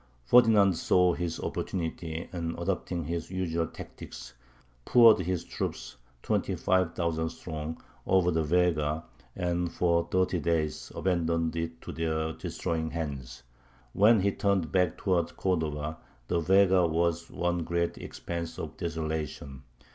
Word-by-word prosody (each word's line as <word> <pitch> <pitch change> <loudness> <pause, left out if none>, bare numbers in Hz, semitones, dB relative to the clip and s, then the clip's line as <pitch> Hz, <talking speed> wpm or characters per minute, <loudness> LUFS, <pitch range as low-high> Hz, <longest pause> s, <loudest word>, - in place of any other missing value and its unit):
Ferdinand 105 - +6
saw 90 +1 +3
his 85 -1 -3
opportunity, 80 -2 -4
and, 85 -1 -3
adopting 85 -1 -2
his 85 +1 -3
usual 85 -3 -1
tactics, 65 - -10 0.5
poured 115 - +7
his 90 -1 -1
troops, - - -5 0.3
twenty - - 0
five 95 -3 +1
thousand 80 -2 -1
strong, 80 -1 -6 0.3
over 90 -2 +4
the 80 -1 +1
Vega, 80 -1 +1 0.3
and 90 -1 -1
for 85 -1 +1
thirty 90 -1 +1
days 80 -1 -1
abandoned 85 -3 0
it 85 0 -3
to - - -7
their 80 -1 -1
destroying 80 0 -3
hands. 70 -6 -5 0.5
When 105 +1 +5
he 100 +1 +2
turned 95 -6 0
back 90 0 +2
towards 90 -4 0
Cordova, 80 -4 -1 0.3
the 85 - +1
Vega 95 0 +4
was 85 +1 0
one 90 0 -1
great 85 +1 -1
expanse 85 -1 -5
of - - -6
desolation. 80 -4 -4
85 Hz, 130 wpm, -29 LUFS, 80-90 Hz, 0.5 s, poured